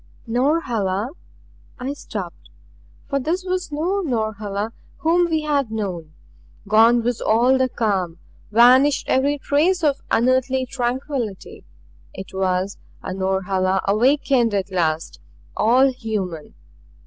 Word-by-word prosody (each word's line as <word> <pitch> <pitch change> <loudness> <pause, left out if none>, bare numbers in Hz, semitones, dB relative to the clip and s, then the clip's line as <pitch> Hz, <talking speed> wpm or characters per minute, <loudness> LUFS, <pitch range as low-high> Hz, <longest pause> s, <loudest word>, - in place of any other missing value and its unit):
"Norhala 235 - 0 0.3
" - - -30
I 280 - -2
stopped. 200 -10 -8 0.6
For 275 - -1
this 330 +7 -2
was 365 -3 -2
no 340 +7 -1
Norhala 215 - -2 0.3
whom 340 +2 +2
we 315 -1 0
had 285 -5 0
known. 180 -8 -5 0.5
Gone 225 +3 +5
was 240 0 -1
all 245 +4 +3 0.2
calm, 190 -7 -1 0.3
vanished 255 +5 +5
every 280 +2 +2
trace 320 +6 +1
of 290 -2 +1
unearthly 255 +2 +2
tranquillity. 250 -4 -4 0.5
It 190 - -9
was 190 0 -1 0.2
a - - -4
Norhala 190 0 0
awakened 245 +1 +2
at 195 0 -2
last 165 -3 -1 0.4
all 255 +5 +4
human. 205 -10 -5
235 Hz, 115 wpm, -21 LUFS, 195-275 Hz, 0.6 s, Gone